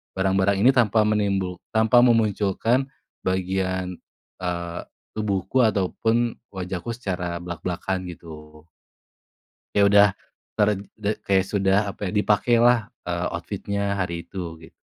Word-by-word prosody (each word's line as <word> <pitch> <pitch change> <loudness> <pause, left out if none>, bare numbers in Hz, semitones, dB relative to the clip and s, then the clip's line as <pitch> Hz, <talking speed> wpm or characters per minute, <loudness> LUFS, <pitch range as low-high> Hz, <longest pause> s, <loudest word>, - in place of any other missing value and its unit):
barang-barang 95 +1 +2
ini 130 - +7
tanpa 115 -4 +3
menimbul 100 -4 0 0.2
tanpa 110 +2 +5
memunculkan 115 +2 +2 0.3
bagian, 95 -1 -2 0.4
eee, 85 -1 -3 0.3
tubuhku 105 +3 +1
ataupun 110 +3 +1 0.2
wajahku 95 +3 -4
secara 90 -7 -4
blak-blakan 90 +1 -4
gitu. 75 -1 -13 1.1
Ya 105 - +4
udah 100 0 +7 0.5
ter 105 -1 +3 0.3
de 105 0 -2
kayak 95 -1 +3
sudah 100 0 +2
apa 100 0 -6
ya - - -2
dipakailah, 115 +2 +3 0.2
eee, 85 +1 -1
outfit-nya 100 0 -3
hari 85 -2 -2
itu 90 -4 -6
gitu. - - -13
100 Hz, 115 wpm, -24 LUFS, 90-110 Hz, 1.1 s, ini